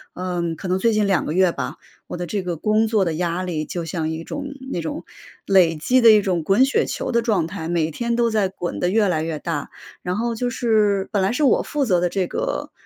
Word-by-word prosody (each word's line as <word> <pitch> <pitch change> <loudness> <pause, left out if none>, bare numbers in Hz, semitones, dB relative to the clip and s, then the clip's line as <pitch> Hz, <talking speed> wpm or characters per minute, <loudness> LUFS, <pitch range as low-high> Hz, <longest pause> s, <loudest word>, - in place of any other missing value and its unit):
嗯， 175 -2 -2
可 190 - -7
能 185 +1 0
最 230 +3 +3
近 215 -1 +2
2 195 -2 +1
个 - - -2
月 185 0 +4
吧， - - -5 0.3
我 - - -6
的 175 - -3
这 200 +4 -2
个 175 -3 -4
工 215 +5 +2
作 215 -4 +2
的 165 - -1
压 175 +2 -2
力 165 -4 -3
就 170 +1 -5
像 160 -1 -2
一 160 +1 -4
种 280 +10 -6 0.3
那 175 - -2
种 165 +1 -5 0.4
累 180 -4 +4
积 250 +12 +2
的 230 - +8
一 215 -1 +7
种 180 -3 0
滚 195 +10 +4
雪 270 - +1
球 - - -3
的 235 -1 +2
状 210 -8 +1
态， 170 -1 -6
每 165 -2 0
天 235 +7 -2
都 235 0 +2
在 210 -3 +1
滚 175 -2 -5
得 180 - +1
越 210 +1 +3
来 165 -4 0
越 160 -1 -3
大。 150 -4 -4 0.3
然 180 0 -2
后 235 +1 -1
就 245 +2 -2
是 215 -5 +1
本 205 -3 +1
来 190 - +1
是 250 +6 -1
我 275 - +4
负 290 -2 -1
责 185 -7 +2
的 175 0 +1
这 190 +1 -1
个 - - -3
190 Hz, 265 characters per minute, -22 LUFS, 170-220 Hz, 0.4 s, 的